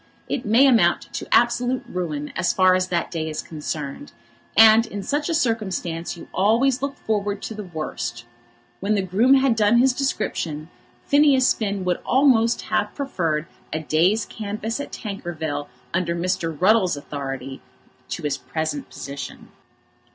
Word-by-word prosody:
It 245 - -3
may 235 +6 +6
amount 250 -5 +3
to - - -5
absolute 245 +2 +2
ruin, 155 -7 -4
as 180 -2 +1
far 185 -1 +5
as 185 0 +1
that 175 -2 -1
day 160 -2 -3
is 155 - -4
concerned; 150 - -6 0.4
and 225 +1 +7
in 205 -2 -6
such 295 - -1
a - - 0
circumstance 190 - -2
you - - -11
always 235 +7 +2
look 280 0 -3
forward 205 -2 -2
to - - -5
the 210 -1 -7
worst. 155 -8 -5 0.5
When 205 +2 0
the 195 - 0
groom 215 +9 +4
had 265 -3 +3
done 215 +1 +4
his 255 +1 +4
description, 165 - -2 0.3
Phineas 285 -3 +4
Finn 200 -3 -3
would 180 -1 0
almost 245 -4 +3
have - - -1
preferred 165 - -1 0.3
a 160 - -1
day's 170 +8 +2
canvass 215 +3 -4
at 285 - -6
Tankerville 160 -8 -5 0.2
under 170 -1 0
Mr. 170 -3 -2
Ruddles's 185 -4 +3
authority 135 -2 -6 0.5
to - - -5
his 145 -2 -1
present 160 - -4
position. 140 -1 -8
200 Hz, 150 wpm, -23 LUFS, 165-235 Hz, 0.5 s, and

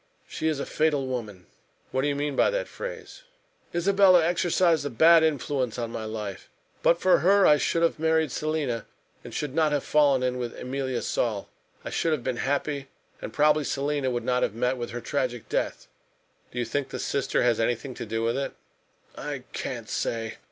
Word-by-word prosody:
She 160 - -3
is 155 -3 0
a - - -2
fatal 150 -3 +1
woman!" 110 -8 -5 0.5
"What 130 - 0
do 140 - +1
you 145 - 0
mean 145 0 -2
by - - +4
that - - -2
phrase?" - - -8 0.5
"Isabella 185 -1 +5
exercised 170 -2 +2
a 145 - -2
bad 160 +7 +6
influence 140 -5 0
on 115 -1 -3
my 110 - -5
life. 105 -3 -6 0.3
But 170 - +4
for 185 - +4
her 195 +2 +5
I 150 - +6
should 165 +3 +1
have 165 - +1
married 160 -2 +2
Selina 150 -7 -2 0.4
and - - -9
should 145 -3 -3
not 155 -1 +2
have 145 -1 0
fallen 140 -4 +3
in 125 0 0
with 120 -1 -4
Emilia 130 -1 -3
Saul. 110 -5 -1 0.4
I - - -4
should 165 - +1
have 140 -6 -2
been 125 -1 -2
happy, 140 +2 -1 0.3
and - - -6
probably 150 0 +3
Selina 140 -1 -1
would 120 -2 -2
not 125 0 +1
have 105 - 0
met 125 +2 +1
with 120 -2 -5
her 120 +1 -5
tragic 125 -4 -2
death." - - -2 0.6
"Do - - -11
you 120 - 0
think 135 +4 -2
the - - -5
sister 140 - 0
has 120 -2 +2
anything 120 +3 -1
to - - -6
do 115 +1 -2
with 115 +3 0
it?" 140 - -4 0.6
"I - - -5
can't - - -4
say. 115 -1 -3
140 Hz, 195 wpm, -26 LUFS, 120-160 Hz, 0.6 s, bad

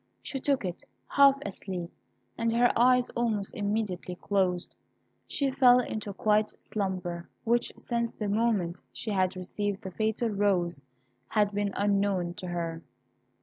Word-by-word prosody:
She 270 - -4
took 270 -5 +1
it, 180 -1 -5 0.3
half 280 -1 +6
asleep, 185 -3 -5 0.4
and 230 0 0
her 240 +1 +4
eyes 250 +1 +4
almost 220 -4 -1
immediately 205 -3 -2
closed. 185 -2 0 0.5
She 275 -2 0
fell 250 -2 +6
into 220 -3 -3
a - - -5
quiet 210 0 +1
slumber, 185 -4 -3
which 235 +1 +1
since 235 -1 -1
the 210 - -4
moment 205 -5 +1
she 220 - -5
had 185 -1 +1
received 200 +2 -3
the 190 - -5
fatal 220 +4 0
rose 190 -7 +1 0.5
had 210 - +2
been 205 0 -1
unknown 200 -3 +1
to 180 - -6
her. 170 -2 -3
205 Hz, 145 wpm, -29 LUFS, 185-230 Hz, 0.5 s, half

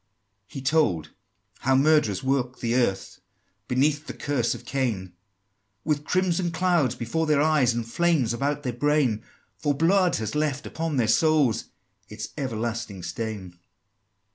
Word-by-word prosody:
XII. 150 - -9
He - - -8
told 115 - +2 0.5
how 135 +1 +2
murderers 140 -6 +3
walk 130 -2 0
the 115 -1 -1
earth 120 -6 0 0.5
Beneath 145 +4 +1
the - - -6
curse 135 -5 -1
of - - -11
Cain, 110 -10 -2 0.7
With 150 -1 -1
crimson 180 -1 +1
clouds 165 -7 +1
before 125 +8 -2
their 150 -2 +3
eyes, 150 -5 +3
And 120 -1 -2
flames 140 -2 +1
about 145 +4 -1
their 125 -3 -2
brain: 130 -3 +1 0.4
For 145 -2 0
blood 180 +4 +3
has 110 -1 -3
left 150 -2 -1
upon 160 -3 -3
their 120 -3 +2
souls 145 -1 +3 0.4
Its 105 +1 -6
everlasting 115 - -3
stain! 100 -6 -5
135 Hz, 140 wpm, -25 LUFS, 115-155 Hz, 0.7 s, murderers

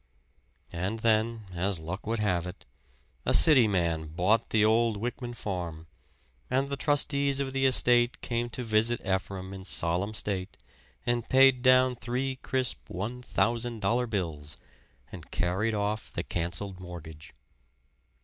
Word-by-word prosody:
And 95 +6 -2
then, 110 0 +1
as 90 +1 0
luck 90 +7 -6
would 115 +1 0
have 90 -5 0
it, 90 +2 -10 0.6
a - - +3
city 135 -8 +7
man 85 -5 0
bought 95 +8 +1
the 110 -1 +3
old 115 0 +3
Wyckman 120 +1 -4
farm, 85 -5 -5 0.6
and 135 +2 0
the 140 - -2
trustees 140 -1 +1
of 135 -1 -2
the 135 0 +3
estate 120 -1 +3
came 120 0 -2
to 125 +2 -5
visit 110 +1 +2
Ephraim 95 0 -3
in 95 -1 -8
solemn 95 +3 0
state 95 -3 -3 0.5
and 120 -1 -1
paid 130 -1 +6
down 130 0 +5
three 125 +3 -3
crisp 130 -1 -3
one 110 +7 -4
thousand 120 -1 -1
dollar 120 +5 +1
bills 80 -9 -3 0.5
and - - -10
carried 100 +6 0
off 105 +1 -2
the - - -3
canceled 90 +3 -4
mortgage. 80 -3 -10
110 Hz, 140 wpm, -28 LUFS, 90-125 Hz, 0.6 s, city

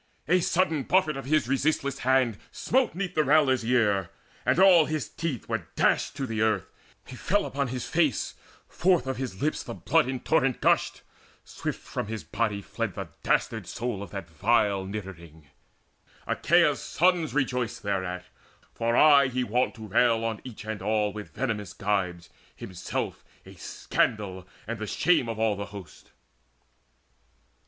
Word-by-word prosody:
A 180 +3 +4
sudden 170 -3 +1
buffet 165 0 +2
of 135 - -6
his 155 -1 +2
resistless 140 0 0
hand 130 -4 +2
Smote 260 -5 0
'neath 190 0 -3
the 155 - +2
railer's 140 -4 +3
ear, 105 -6 +2 0.4
and - - +3
all 180 -4 +7
his 155 -2 -2
teeth 155 -8 -4
Were - - -3
dashed - - +2
to 135 - -3
the 110 -3 -3
earth: 110 -4 +2 0.4
he 130 - -10
fell 200 +10 0
upon 140 -1 -2
his 125 0 -4
face: 160 -8 +1 0.3
Forth 180 -6 +2
of 130 0 -3
his 125 -6 -5
lips 155 - 0
the - - -7
blood 165 -5 +2
in 130 -1 -2
torrent 135 -4 +1
gushed: - - +1 0.4
Swift - - -5
from - - -5
his 110 0 -5
body 105 -2 -2
fled - - -4
the - - -6
dastard - - 0
soul 115 -2 -4
Of 100 - -7
that 95 -2 -6
vile 100 +3 +1
niddering. 85 -6 -8 0.8
Achaea's - - +3
sons 175 -3 +1
Rejoiced 125 -4 -1
thereat, 95 -3 -2 0.5
for 115 +1 0
aye 140 -3 +7
he 130 0 -1
wont 125 +2 0
to 110 -2 -9
rail 115 +2 +3
On 110 -2 -3
each 120 -4 -9
and 110 -3 -4
all 105 0 0
with 105 -1 -7
venomous 110 -5 -3
gibes, 90 -4 -2 0.3
himself 95 -2 -5 0.2
A - - -12
scandal 95 -4 -2 0.2
and 115 0 -5
the 110 - -4
shame 160 -5 +2
of 115 - -4
all 110 -1 +1
the 100 0 -5
host. 100 -6 -12
120 Hz, 160 wpm, -27 LUFS, 105-140 Hz, 0.8 s, all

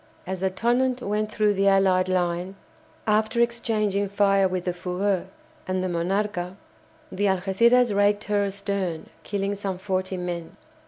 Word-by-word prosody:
As 190 0 -4
the 190 +1 +1
"Tonnant" 245 +6 0
went 210 +1 -1
through 210 -1 +2
the 195 0 +1
allied 190 -1 +4
line, 180 +1 -1 0.5
after 220 +2 +1
exchanging 215 -4 0
fire 195 -1 +3
with 185 -1 -3
the 180 - 0
"Fougueux" 185 +2 -1 0.4
and 185 0 -1
the - - 0
"Monarca," 180 +1 -1 0.6
the 205 - -1
"Algéciras" 205 +5 +3
raked 205 +1 +3
her 205 -1 +1
astern, 200 -4 -3
killing 200 0 -2
some 195 -2 -4
forty 185 0 -2
men. 175 -2 -5
195 Hz, 145 wpm, -25 LUFS, 185-210 Hz, 0.6 s, allied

